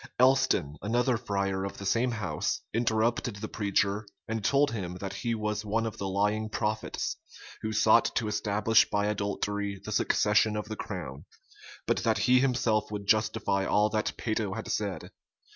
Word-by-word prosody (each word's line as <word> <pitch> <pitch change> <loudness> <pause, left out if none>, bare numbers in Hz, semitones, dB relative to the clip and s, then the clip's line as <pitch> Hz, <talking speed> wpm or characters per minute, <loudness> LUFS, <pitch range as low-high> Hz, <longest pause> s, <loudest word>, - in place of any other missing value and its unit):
Elston, 130 - +3
another 120 +4 +1
friar 100 -4 -1
of 100 - -5
the 100 - -7
same 115 +6 +2
house, 110 -6 -2
interrupted 115 0 +1
the 105 +1 -5
preacher, 100 0 0 0.2
and 110 -1 -3
told 140 +6 +3
him 90 -6 -4
that 95 +1 -5
he 115 -1 -2
was 105 0 -2
one 110 +2 0
of 110 - -5
the 100 - -2
lying 105 +3 0
prophets, 110 0 -2 0.4
who 110 - -2
sought 110 +1 +5
to 110 - 0
establish 105 +1 +2
by 105 0 +1
adultery 100 -1 -2
the - - -5
succession 105 +1 +2
of 105 - -4
the 110 - -3
crown; 90 - -6 0.6
but - - +1
that 110 -2 +1
he 125 +4 +4
himself 120 -5 +1
would 105 -1 -5
justify 110 -2 +1
all 105 +2 +2
that 110 0 -1
Peyto 110 -3 -2
had - - -5
said. - - -3
105 Hz, 165 wpm, -29 LUFS, 100-115 Hz, 0.6 s, sought